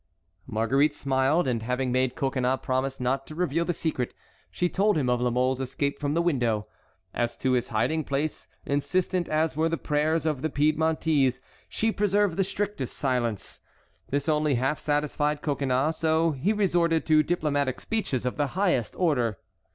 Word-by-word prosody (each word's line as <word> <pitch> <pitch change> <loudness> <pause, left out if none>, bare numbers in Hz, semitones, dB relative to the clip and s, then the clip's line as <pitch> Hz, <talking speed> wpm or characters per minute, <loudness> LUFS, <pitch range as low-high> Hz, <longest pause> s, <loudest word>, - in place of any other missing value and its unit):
Marguerite 135 +6 +2
smiled, 135 +4 +1
and 120 -3 0
having 125 +2 -1
made 130 0 +1
Coconnas 130 -1 0
promise 130 +1 -1
not 135 +2 -1
to 155 - -9
reveal 170 -1 0
the 175 - 0
secret, 155 -7 -2 0.3
she 135 - 0
told 200 +2 +2
him 130 -4 +1
of 125 0 +1
La 125 - +2
Mole's 130 +2 +1
escape 140 +2 -2
from 145 0 -1
the 170 - +2
window. 120 -10 +1 0.5
As 120 -1 -1
to 130 - 0
his 125 -2 +1
hiding 120 +9 0
place, 145 +2 -2 0.2
insistent 175 +5 0
as 155 0 +1
were 160 +2 +1
the 165 - -1
prayers 155 +2 0
of 150 -4 -1
the 160 - -1
Piedmontese, 150 -3 +2 0.3
she 225 0 0
preserved 205 -3 +1
the 195 - +2
strictest 195 - -3
silence. 120 -7 -2 0.5
This 140 +1 -1
only 150 -2 +2
half 135 +5 0
satisfied 150 0 0
Coconnas, 140 +1 0
so 160 +1 +2
he 150 +8 0
resorted 175 -6 +2
to 155 -1 +5
diplomatic 145 -5 0
speeches 205 - -2
of 125 - -2
the 145 -1 +1
highest 175 - +1
order. 125 - +1
145 Hz, 165 wpm, -26 LUFS, 130-160 Hz, 0.5 s, to